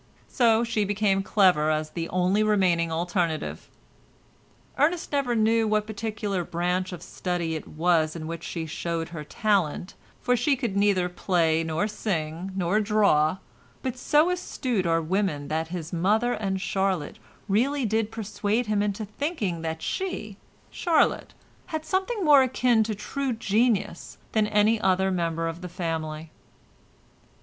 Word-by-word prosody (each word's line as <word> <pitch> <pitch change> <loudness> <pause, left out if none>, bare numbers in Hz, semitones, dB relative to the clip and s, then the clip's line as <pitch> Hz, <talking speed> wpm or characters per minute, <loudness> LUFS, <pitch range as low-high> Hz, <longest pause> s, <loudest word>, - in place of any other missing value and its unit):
So 230 -2 +3
she 225 -2 0
became 200 -1 +1
clever 185 -6 +3
as 155 0 -1
the 170 -1 -4
only 185 +3 +2
remaining 185 -6 +2
alternative. 170 -1 -2 1.1
Ernest 325 +4 +1
never 275 -4 +1
knew 225 0 +3
what 215 0 +1
particular 210 -3 -3
branch 180 +2 -1
of 175 -2 -8
study 175 -3 -3
it 155 - -5
was 160 -1 +1
in 160 -2 -6
which 165 +1 -6
she 165 -2 -4
showed 165 +1 -3
her 165 -3 -6
talent, 195 -2 0 0.3
for 250 0 +2
she 275 +4 +2
could 240 -7 -3
neither 200 -3 +3
play 170 -3 +1
nor 165 +5 -1
sing 180 -4 -3
nor 190 +2 +1
draw, 200 -7 +3 0.5
but 260 -2 -2
so 300 +6 +3
astute 255 - -2
are 165 0 +2
women 165 -4 -1
that 160 +1 -1
his 170 -1 -6
mother 215 +8 +2
and 195 -2 -2
Charlotte 190 -6 -1 0.3
really 255 +7 +1
did 220 0 0
persuade 215 +1 -1
him 210 -1 +1
into 210 +1 -2
thinking 210 - -3
that 160 0 -4
she, 285 - -3 0.4
Charlotte, 335 -3 +1 0.3
had 315 -3 -4
something 380 +3 -1
more 290 -3 +7
akin 250 -3 +3
to 215 -1 -2
true 270 +5 -3
genius 220 -3 0
than 215 -1 +2
any 215 +1 +3
other 190 0 +2
member 165 -2 -1
of 165 +2 -5
the 180 - -6
family. 160 -2 -4
195 Hz, 145 wpm, -26 LUFS, 170-225 Hz, 1.1 s, more